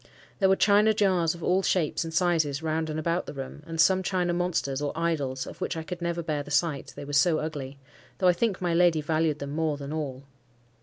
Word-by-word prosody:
There 190 Hz, -2 st, +4 dB
were 190 Hz, -, +5 dB
china 210 Hz, +2 st, +4 dB
jars 185 Hz, -5 st, +2 dB
of 170 Hz, -, -10 dB
all 185 Hz, +2 st, +2 dB
shapes 175 Hz, -5 st, 0 dB
and 165 Hz, -, -6 dB
sizes 160 Hz, -4 st, +1 dB
round 160 Hz, 0 st, -1 dB
and 155 Hz, -, -3 dB
about 170 Hz, +3 st, -1 dB
the -, -, -7 dB
room, 135 Hz, +2 st, -7 dB
and 165 Hz, -1 st, -6 dB
some 190 Hz, +3 st, +5 dB
china 180 Hz, -2 st, 0 dB
monsters, 170 Hz, -6 st, -1 dB
or 145 Hz, -, -1 dB
idols, 145 Hz, -6 st, -1 dB
of -, -, -11 dB
which 170 Hz, -, -2 dB
I 160 Hz, -, -4 dB
could 180 Hz, +1 st, -7 dB
never 170 Hz, 0 st, -2 dB
bear 155 Hz, -2 st, -2 dB
the 145 Hz, -, -10 dB
sight, 150 Hz, -2 st, 0 dB
they -, -, -7 dB
were 145 Hz, -, -7 dB
so 160 Hz, +2 st, +4 dB
ugly, 145 Hz, -4 st, -5 dB, 0.4 s
though 185 Hz, -, +2 dB
I 180 Hz, -, +6 dB
think 200 Hz, +1 st, 0 dB
my 175 Hz, -2 st, 0 dB
lady 170 Hz, -2 st, +4 dB
valued 155 Hz, 0 st, 0 dB
them 140 Hz, -1 st, -6 dB
more 155 Hz, -1 st, -1 dB
than 140 Hz, +1 st, -6 dB
all. 140 Hz, -4 st, -4 dB
160 Hz, 235 wpm, -27 LUFS, 145-180 Hz, 0.4 s, I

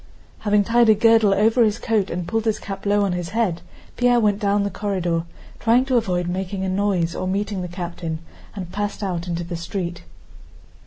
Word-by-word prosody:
Having 210 Hz, -1 st, +2 dB
tied 235 Hz, +2 st, +4 dB
a 215 Hz, -, +7 dB
girdle 225 Hz, -1 st, +5 dB
over 220 Hz, +5 st, +3 dB
his 215 Hz, -1 st, +2 dB
coat 215 Hz, -4 st, 0 dB
and 175 Hz, 0 st, -4 dB
pulled 225 Hz, 0 st, -1 dB
his 220 Hz, -2 st, +1 dB
cap 195 Hz, 0 st, -6 dB
low 205 Hz, 0 st, +3 dB
on 195 Hz, -, 0 dB
his 175 Hz, -1 st, -3 dB
head, 185 Hz, -8 st, +1 dB, 0.4 s
Pierre 245 Hz, -1 st, +4 dB
went 210 Hz, -2 st, +2 dB
down 205 Hz, -1 st, +1 dB
the 200 Hz, -, -2 dB
corridor, 175 Hz, -5 st, -1 dB, 0.3 s
trying 235 Hz, +3 st, +3 dB
to 265 Hz, -1 st, 0 dB
avoid 180 Hz, -7 st, +1 dB
making 190 Hz, +2 st, -3 dB
a -, -, -1 dB
noise 185 Hz, -3 st, 0 dB
or 185 Hz, -, -3 dB
meeting 200 Hz, 0 st, -2 dB
the 180 Hz, -, -4 dB
captain, 175 Hz, -2 st, -5 dB, 0.4 s
and 180 Hz, -4 st, -6 dB
passed 205 Hz, +1 st, -3 dB
out 180 Hz, -3 st, -3 dB
into 175 Hz, 0 st, -2 dB
the 170 Hz, +1 st, -5 dB
street. 170 Hz, +1 st, -4 dB
200 Hz, 200 wpm, -22 LUFS, 180-215 Hz, 0.4 s, a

